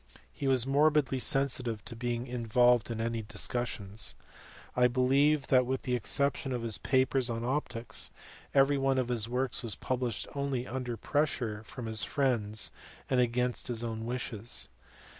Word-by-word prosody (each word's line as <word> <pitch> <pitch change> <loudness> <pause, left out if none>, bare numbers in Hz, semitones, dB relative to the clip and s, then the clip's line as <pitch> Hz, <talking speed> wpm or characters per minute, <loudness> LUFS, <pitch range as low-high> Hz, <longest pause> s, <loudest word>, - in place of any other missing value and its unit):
He 140 - -3
was 130 -3 +4
morbidly 145 -1 +3
sensitive 125 -5 +1
to 115 - -7
being 120 +1 -2
in 125 -2 -4
volved 120 +1 +4
in 115 -1 -4
any 115 0 -1
discussions. 105 -2 -2 0.6
I 125 0 +5
believe 135 +4 +3
that, 130 -1 +5
with 130 0 -2
the 125 - -2
exception 140 +2 +1
of 120 -2 -3
his 115 -2 0
papers 130 -1 +2
on 115 0 -3
optics, 125 -3 -1 0.4
every 140 0 +4
one 135 0 +2
of 125 -2 0
his 115 -2 0
works 125 +1 -1
was 115 -4 0
published 125 -4 -2
only 140 -3 -2
under 125 -2 -4
pressure 125 -6 -1
from 125 - -7
his 110 -1 +1
friends 115 -7 0 0.4
and 130 - +3
against 125 0 0
his 120 -2 -1
own 115 -1 -4
wishes. 115 - -2
125 Hz, 160 wpm, -30 LUFS, 115-135 Hz, 0.6 s, I